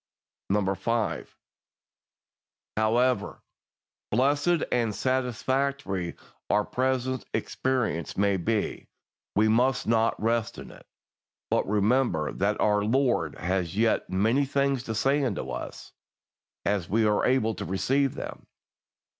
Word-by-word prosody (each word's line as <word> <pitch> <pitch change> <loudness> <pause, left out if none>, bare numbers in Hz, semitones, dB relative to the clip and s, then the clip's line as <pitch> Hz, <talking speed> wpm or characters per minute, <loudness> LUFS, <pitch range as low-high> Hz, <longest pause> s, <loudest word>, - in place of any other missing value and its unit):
5. 105 +3 -1 1.4
However 110 0 +1 0.7
blessed 145 +7 +2
and 115 -4 +1
satisfactory 130 -6 -1 0.3
our 105 0 +2
present 130 0 -1
experience 125 - -1
may 100 0 +2
be, 105 +4 -2 0.5
we 105 +2 +4
must 125 +4 +2
not 115 0 +2
rest 115 0 0
in - - -9
it, - - -16 0.6
but - - +1
remember 105 - +2
that 100 +2 -1
our 105 -1 +3
Lord 125 +3 +1
has 90 0 -2
yet 110 0 +2
many 110 +9 +2
things 140 -1 0
to 110 - -3
say 135 +6 +2
unto 120 -8 -2
us, - - -7 0.7
as 95 -4 0
we 110 +2 +2
are 105 -1 +2
able 120 -4 +2
to - - -6
receive 135 +8 0
them. - - -7
115 Hz, 115 wpm, -27 LUFS, 105-130 Hz, 1.4 s, we